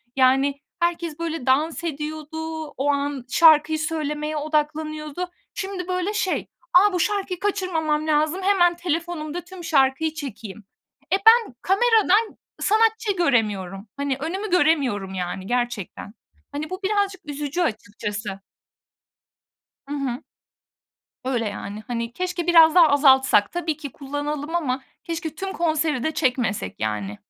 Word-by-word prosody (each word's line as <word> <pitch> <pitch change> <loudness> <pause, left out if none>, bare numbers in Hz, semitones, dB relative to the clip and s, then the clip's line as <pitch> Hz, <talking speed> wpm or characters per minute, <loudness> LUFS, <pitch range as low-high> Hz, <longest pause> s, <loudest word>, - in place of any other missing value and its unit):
yani, 270 +1 +3 0.2
herkes, 340 -2 -1
böyle, 330 -5 -3
dans 305 +5 +1
ediyordu, 315 +1 -5
o 275 +3 0
an 280 -2 -2
şarkıyı 315 0 +5
söylemeye 305 -1 -2
odaklanıyordu. 305 +2 -2 0.2
Şimdi, 380 -2 -5
böyle, 365 +2 -1
şey, 400 -3 -1 0.3
a, 390 +3 +6
bu 360 - 0
şarkıyı 390 -1 -1
kaçırmamam 330 -7 -1
lazım, 310 +4 +1
hemen 370 -3 +3
telefonumda 340 -1 -3
tüm 355 +1 -11
şarkıyı 290 0 +2
çekeyim. 230 -9 -8 0.5
E, 385 - +5
ben 455 - +6
kameradan 435 +1 +3 0.2
sanatçı 445 0 +2
göremiyorum, 210 - 0
hani, 280 -2 -1
önümü 375 +8 -3
göremiyorum, 275 - +2
yani, 185 +1 -4
gerçekten. 240 -4 -3 0.4
Hani, 295 +2 -4
bu 370 - -5
birazcık 400 -2 0
üzücü 290 +3 -3
açıkçası. 210 - -3 1.5
Hı 290 - -4
hı. 265 -2 -3 1.0
Öyle, 245 -4 0
yani, 205 +1 -7
hani, 235 -1 -3
keşke 355 0 -3
biraz 330 -1 +7
daha 340 -3 +8
azaltsak. 265 -7 +5
Tabii 335 -3 -2
ki 290 -3 -7
kullanalım 290 +3 -4
ama 265 -6 -1 0.2
keşke 325 -2 -4
tüm 385 +3 -4
konseri 315 -5 0
de 315 - 0
çekmesek, 235 - -1
yani. 105 -2 -3
310 Hz, 125 wpm, -23 LUFS, 265-350 Hz, 1.5 s, daha